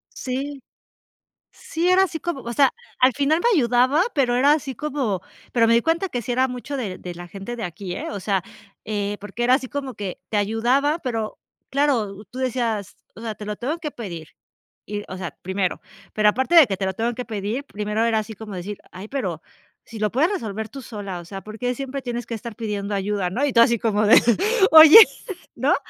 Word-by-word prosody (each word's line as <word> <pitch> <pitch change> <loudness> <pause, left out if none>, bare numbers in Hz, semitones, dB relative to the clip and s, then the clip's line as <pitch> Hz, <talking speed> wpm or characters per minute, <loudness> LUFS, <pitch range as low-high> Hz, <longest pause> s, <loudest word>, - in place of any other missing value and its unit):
Sí. 270 +1 -4 0.9
Sí, 335 +2 -2
era 375 +1 +5
así 335 -3 -5
como, 345 -5 -3
o 235 -1 -5
sea, 275 -1 +4 0.3
al 255 +1 +6
final 290 +5 +1
me 450 -7 +3
ayudaba, 255 +6 +3
pero 250 -4 +2
era 280 +4 +5
así 280 -3 -2
como, 265 -10 -2 0.3
pero 230 -2 +3
me 230 - +4
di 235 - +4
cuenta 335 +6 0
que 245 -9 -3
sí 245 - -4
era 255 +2 +2
mucho 250 +3 -5
de 200 -8 -4
de 180 - -7
la 175 +1 -9
gente 200 +6 -7
de 230 - -5
aquí, 180 +1 -6
¿eh? - - -5
O 200 - -5
sea, 195 0 0 0.4
eh, 205 -1 -2
porque 205 +4 -5
era 250 +1 +5
así 265 -1 -3
como 275 -1 -5
que 200 -3 -5
te 210 - 0
ayudaba, 245 +9 +1
pero 225 -7 -3 0.3
claro, 235 -8 0
tú 255 - -7
decías, 230 -6 -2 0.2
o - - -11
sea, 225 -2 -4
te 210 - -9
lo 210 0 -4
tengo 295 +7 -3
que 300 -3 -5
pedir. 170 - -8 0.6
Y, 205 0 -5
o 185 - -5
sea, 180 -2 -5
primero, 190 0 -2 0.3
pero 215 0 +4
aparte 260 +10 0
de 320 -5 +9
que 195 - -2
te 190 - -2
lo 190 - -1
tengo 230 +4 -1
que 250 - -5
pedir, 220 +5 -4
primero 210 +1 -2
era 225 -1 +2
así 215 +1 -6
como 210 -1 -9
decir: 195 +3 -6
"Ay, 190 +3 -9
pero 185 - -3 0.4
si 225 - -10
lo 210 0 +1
puedes 315 - +2
resolver 220 - -4
tú 270 0 -9
sola, 205 -6 -6
o 175 - -10
sea. 195 +2 -8
¿Por 215 +2 -10
qué 250 0 -1
siempre 275 +1 -5
tienes 240 -2 -4
que 235 - -6
estar 225 0 -8
pidiendo 205 -2 -3
ayuda, 200 -1 -1
no?" 250 +10 0
Y 285 - 0
tú 230 - +4
así 235 0 +4
como 215 -1 +1
de: 220 - +8 0.6
"Oye", 320 +5 +11 0.6
¿no? - - +2
230 Hz, 220 wpm, -23 LUFS, 205-270 Hz, 0.9 s, Oye